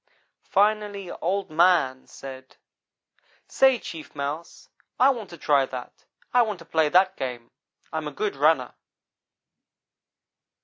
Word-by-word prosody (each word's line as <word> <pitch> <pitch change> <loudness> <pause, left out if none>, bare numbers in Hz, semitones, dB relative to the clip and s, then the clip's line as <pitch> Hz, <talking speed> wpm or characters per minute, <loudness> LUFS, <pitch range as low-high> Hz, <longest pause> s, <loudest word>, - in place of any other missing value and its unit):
Finally 205 -2 +1
Oldman 170 -7 +2
said: 130 -1 -11 0.9
"'Say, 265 -1 +4
Chief 165 -9 -9
Mouse, 145 +4 -5 0.3
I 265 +2 +6
want 225 -7 -6
to 170 - -10
try 140 -3 +2
that. 125 -1 -9 0.3
I 250 - +6
want 215 -4 -1
to 170 - -14
play 160 -2 +2
that 185 +3 +4
game. 125 -3 -6 0.4
I - - -2
am 155 -1 -3
a - - -5
good 205 +6 -2
runner.' 145 -2 +2
165 Hz, 125 wpm, -25 LUFS, 140-200 Hz, 0.9 s, I